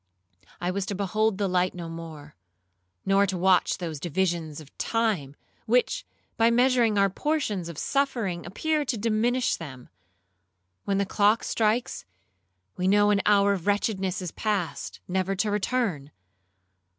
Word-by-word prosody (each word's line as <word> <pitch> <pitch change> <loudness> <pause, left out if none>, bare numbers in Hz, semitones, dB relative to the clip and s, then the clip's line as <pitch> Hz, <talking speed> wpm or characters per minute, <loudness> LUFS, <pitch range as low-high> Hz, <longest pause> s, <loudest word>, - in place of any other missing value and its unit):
I 175 +1 -1
was 195 0 -3
to 200 - -3
behold 205 +2 0
the 200 -1 0
light 180 0 +1
no 170 -2 -6
more; 160 -3 -9 0.7
nor 195 +1 +3
to 190 -1 -2
watch 185 0 +3
those 165 -5 -5
divisions 170 -2 -1
of 150 -3 -15
time, 210 -12 0 0.3
which, 245 +2 +1 0.3
by 230 0 +5
measuring 240 -2 +3
our 200 0 +5
portions 210 - -2
of 165 - -8
suffering, 235 - -1
appear 300 - -1
to 250 -4 -2
diminish 230 +3 +1
them. 130 -6 -10 1.0
When 195 - 0
the 200 - +1
clock 210 +3 +2
strikes, 225 +2 0 0.7
we 185 - -1
know 205 +1 +4
an 200 -1 +2
hour 200 -1 +5
of 190 -1 -5
wretchedness 195 -2 0
is 175 - -4
past, 205 -6 -3
never 190 +1 -1
to 205 +2 0
return. 205 - -1
200 Hz, 145 wpm, -26 LUFS, 175-220 Hz, 1.0 s, by